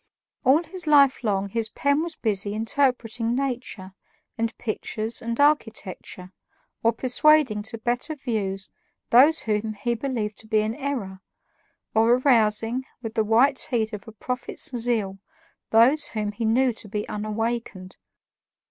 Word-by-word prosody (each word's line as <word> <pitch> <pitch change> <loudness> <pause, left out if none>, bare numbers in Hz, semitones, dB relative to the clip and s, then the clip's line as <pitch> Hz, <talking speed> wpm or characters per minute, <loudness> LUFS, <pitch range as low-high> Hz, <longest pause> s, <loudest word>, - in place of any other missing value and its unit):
All 280 +5 +4
his 360 -1 -4
life 280 -4 +5
long 200 -2 0
his 225 +1 -1
pen 285 +6 +1
was 335 0 -4
busy 205 -2 -1
interpreting 230 0 0
nature 245 -8 -4 0.4
and 230 -1 -3
pictures 220 0 -1
and 230 +1 -4
architecture, 220 - -1 0.5
or 230 - +3
persuading 255 -1 +3
to 220 +2 -5
better 245 +7 -2
views 200 -8 -3 0.4
those 290 +7 +6
whom 215 0 -2
he 235 +4 -1
believed 230 -4 -3
to 220 - -15
be 215 -1 +2
in 215 +1 -2
error, 235 -9 -4 0.7
or 225 +2 +4
arousing, 235 -1 +2 0.2
with 225 -1 -5
the 220 - +1
white 235 +6 +3
heat 225 -3 -1
of 210 +3 -7
a - - -8
prophet's 250 +3 -4
zeal, 225 -5 -1 0.5
those 255 +7 +5
whom 210 -2 -3
he 215 +2 -4
knew 245 +3 +2
to 220 - -10
be 210 +1 -4
unawakened. 215 -3 -4
230 Hz, 140 wpm, -24 LUFS, 215-255 Hz, 0.7 s, those